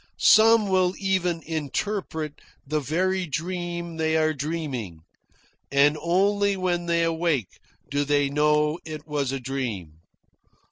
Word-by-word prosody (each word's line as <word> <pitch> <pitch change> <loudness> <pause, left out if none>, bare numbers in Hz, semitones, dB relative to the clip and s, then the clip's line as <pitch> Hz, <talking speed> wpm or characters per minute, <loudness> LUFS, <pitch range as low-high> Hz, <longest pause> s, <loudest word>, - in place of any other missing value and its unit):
Some 225 -1 +6
will 185 -1 +2
even 180 -4 0
interpret 160 0 -3 0.2
the 150 +2 -1
very 180 +6 -1
dream 170 +1 -4
they 160 0 +1
are 155 0 +2
dreaming; 140 - -4 0.7
and 140 +2 +4
only 200 +4 +2
when 175 -2 -1
they 170 0 +2
awake 165 - -1 0.3
do 145 0 0
they 145 0 +2
know 150 +2 +2
it 155 -1 -8
was 145 -3 -1
a 135 - -3
dream.... 115 - -5
160 Hz, 125 wpm, -25 LUFS, 145-180 Hz, 0.7 s, Some